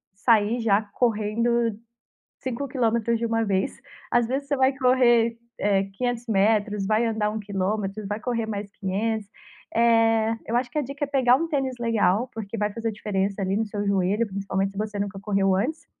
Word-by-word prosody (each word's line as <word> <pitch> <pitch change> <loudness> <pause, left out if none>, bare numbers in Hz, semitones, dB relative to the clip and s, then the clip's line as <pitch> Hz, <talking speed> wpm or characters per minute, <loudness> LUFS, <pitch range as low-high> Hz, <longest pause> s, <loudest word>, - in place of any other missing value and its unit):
sair 225 +2 +2
já 210 -2 +3
correndo 230 0 +1 0.6
5 260 +2 -4
quilômetros 235 -2 +1
de 235 - -1
uma 225 0 +1
vez. 195 +3 -1 0.3
Às 240 -1 +2
vezes, 275 +3 -2
você 285 - +1
vai 265 +1 +3
correr, 240 -3 +4 0.2
eh, 195 -1 +2
500 245 +2 -2
metros, 210 -1 +2
vai 215 +3 +2
andar 220 -2 0
1 220 - -4
quilômetro, 200 +1 -2
vai 205 +1 -3
correr 230 -1 -2
mais 205 -2 -4
500. 205 +2 -2 0.5
Eh, 225 -1 +3
eu 230 - -2
acho 245 0 -1
que 300 - -6
a - - +3
dica 280 +2 -3
é - - -13
pegar 260 -2 +4
um 330 - -2
tênis 270 -4 -1
legal, 230 0 +1
porque 220 0 -6
vai 210 0 0
fazer 230 -1 -2
diferença 200 -1 -2
ali 190 0 0
no 220 +2 0
seu 205 -1 -4
joelho, 200 +3 +1
principalmente 195 0 -2
se - - -11
você 210 -1 -3
nunca 200 -1 -3
correu 195 -1 +1
antes. 305 +11 -2
220 Hz, 185 wpm, -25 LUFS, 205-240 Hz, 0.6 s, correr